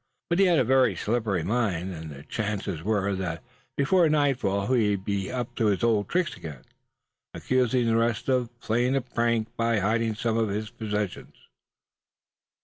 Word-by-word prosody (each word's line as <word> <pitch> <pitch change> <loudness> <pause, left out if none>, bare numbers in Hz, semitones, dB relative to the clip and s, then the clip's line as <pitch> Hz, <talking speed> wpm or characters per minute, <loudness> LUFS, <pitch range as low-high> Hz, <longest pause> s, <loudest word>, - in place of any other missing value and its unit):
But 170 - +2
he 195 - +6
had 175 -3 +4
a 130 - +4
very 130 +1 +3
slippery 110 -6 -1
mind, 95 -3 -1
and 80 -1 -7
the 70 -1 -10
chances 100 -5 -3
were 100 0 0
that 85 -4 -4 0.3
before 165 +4 +4
nightfall 130 -10 +1
he 115 -5 +3
would 95 0 -8
be 100 -2 -2
up 125 -2 -4
to 115 - +2
his 100 0 +1
old 110 -3 +2
tricks 180 -1 0
again, 75 -6 -9 0.7
accusing 125 -1 +1
the 115 -1 +2
rest 115 0 0
of 125 -3 +1
playing 120 +4 +1
a 135 - +2
prank 115 -2 -1
by 115 -1 +1
hiding 110 +2 +1
some 115 +1 0
of 110 -2 +1
his 105 +2 -3
possessions. 105 -4 -4
110 Hz, 170 wpm, -26 LUFS, 100-125 Hz, 0.7 s, he